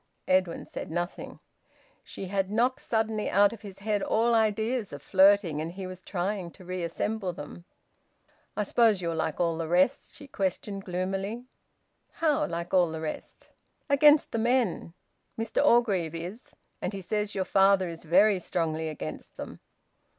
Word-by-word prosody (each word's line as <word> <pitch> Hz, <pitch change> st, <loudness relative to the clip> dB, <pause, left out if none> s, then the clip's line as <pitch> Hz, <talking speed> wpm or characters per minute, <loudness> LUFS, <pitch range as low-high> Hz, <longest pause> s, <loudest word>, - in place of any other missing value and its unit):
Edwin 185 Hz, -2 st, +1 dB
said -, -, -7 dB
nothing. 175 Hz, +2 st, -4 dB, 0.6 s
She -, -, -8 dB
had 195 Hz, 0 st, -1 dB
knocked 240 Hz, +5 st, +1 dB
suddenly 220 Hz, -1 st, -1 dB
out 205 Hz, +2 st, +4 dB
of 230 Hz, -, -11 dB
his 195 Hz, -2 st, -10 dB
head 205 Hz, 0 st, -1 dB
all 230 Hz, +4 st, +2 dB
ideas 220 Hz, +1 st, +1 dB
of 145 Hz, 0 st, -9 dB
flirting, 190 Hz, -5 st, +4 dB
and 165 Hz, +2 st, -5 dB
he 190 Hz, 0 st, -6 dB
was 185 Hz, 0 st, -8 dB
trying 185 Hz, 0 st, -3 dB
to 185 Hz, -, -15 dB
reassemble 185 Hz, +3 st, -3 dB
them. 160 Hz, +3 st, -10 dB, 0.9 s
"I 210 Hz, -, +1 dB
suppose 220 Hz, -1 st, +3 dB
you're 170 Hz, -2 st, -2 dB
like 160 Hz, -1 st, -2 dB
all 170 Hz, -2 st, 0 dB
the 165 Hz, -, -2 dB
rest?" 185 Hz, +10 st, +1 dB
she 285 Hz, -, -11 dB
questioned 195 Hz, -2 st, -3 dB
gloomily. 195 Hz, +6 st, -3 dB, 0.7 s
"How 310 Hz, -3 st, +1 dB
like 170 Hz, +1 st, -5 dB
all 180 Hz, -3 st, +4 dB
the 160 Hz, 0 st, -5 dB
rest?" 160 Hz, -1 st, -7 dB, 0.4 s
"Against 295 Hz, +1 st, +5 dB
the 230 Hz, -, -1 dB
men. 230 Hz, -8 st, 0 dB, 0.4 s
Mr 225 Hz, 0 st, 0 dB
Orgreave 195 Hz, -9 st, +3 dB
is, 180 Hz, +9 st, -8 dB, 0.3 s
and 180 Hz, -, -2 dB
he 195 Hz, -, -5 dB
says 210 Hz, +2 st, -2 dB
your 190 Hz, -1 st, 0 dB
father 195 Hz, -1 st, +4 dB
is 165 Hz, -1 st, -8 dB
very 190 Hz, +4 st, +4 dB
strongly 160 Hz, -2 st, -2 dB
against 80 Hz, -, -7 dB
them." -, -, -8 dB
195 Hz, 160 wpm, -28 LUFS, 170-215 Hz, 0.9 s, Against